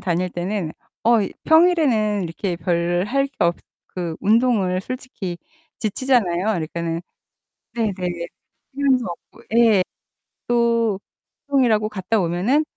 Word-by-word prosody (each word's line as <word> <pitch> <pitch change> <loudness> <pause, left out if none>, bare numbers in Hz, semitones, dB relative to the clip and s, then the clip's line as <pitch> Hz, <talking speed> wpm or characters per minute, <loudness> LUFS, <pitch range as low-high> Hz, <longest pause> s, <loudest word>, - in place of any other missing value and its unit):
다닐 180 0 0
때는 175 -2 -3 0.3
어, 230 0 +5
이 - - -4
평일에는 295 - +4
이렇게 170 +2 -3
별 175 +1 0
할 275 +4 +1
게 - - -17
없 170 0 +3 0.4
그 170 -3 -3
운동을 210 -5 +2
솔직히 200 -7 -6 0.4
지치잖아요. 215 -5 +1
그러니까는 170 -4 -2 0.8
네네. 220 -4 0 0.8
휴일도 270 -3 +2
없고 175 - -10
예. 225 -5 +6 0.7
또 230 -4 +2 0.5
운동이라고 235 -6 +3
갔다 210 +1 -1
오면은 185 - +2
210 Hz, 250 characters per minute, -22 LUFS, 175-240 Hz, 0.8 s, 예